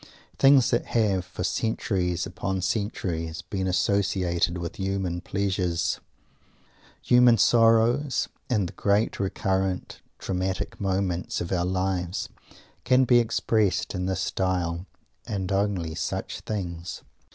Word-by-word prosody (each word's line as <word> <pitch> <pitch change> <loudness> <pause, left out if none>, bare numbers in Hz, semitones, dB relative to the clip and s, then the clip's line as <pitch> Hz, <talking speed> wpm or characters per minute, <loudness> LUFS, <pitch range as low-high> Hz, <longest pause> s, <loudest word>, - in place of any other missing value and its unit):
Things 135 -2 +6
that 120 - +1
have, 100 -5 +2
for 90 -2 -6
centuries 90 -6 -1
upon 95 -1 -3
centuries, 90 -5 -2
been 95 -2 -3
associated 90 -2 +1
with 85 -1 -5
human 95 -3 -2
pleasures, 90 -3 -1 1.0
human 125 -1 +6
sorrows, 115 +5 +3 0.2
and 105 -7 +1
the - - -10
great 100 +2 +1
recurrent 95 -1 -1 0.2
dramatic 95 0 -3
moments 95 -3 -1
of 85 - -4
our 90 -2 +1
lives, 95 -1 -1 0.5
can 130 +1 +4
be 120 0 +5
expressed 110 -3 +1
in 90 -1 -2
this 95 0 -1
style; 90 -1 -1 0.4
and 95 -2 -3
only 95 -5 0
such - - -3
things. 90 -5 -5
95 Hz, 115 wpm, -26 LUFS, 90-105 Hz, 1.0 s, Things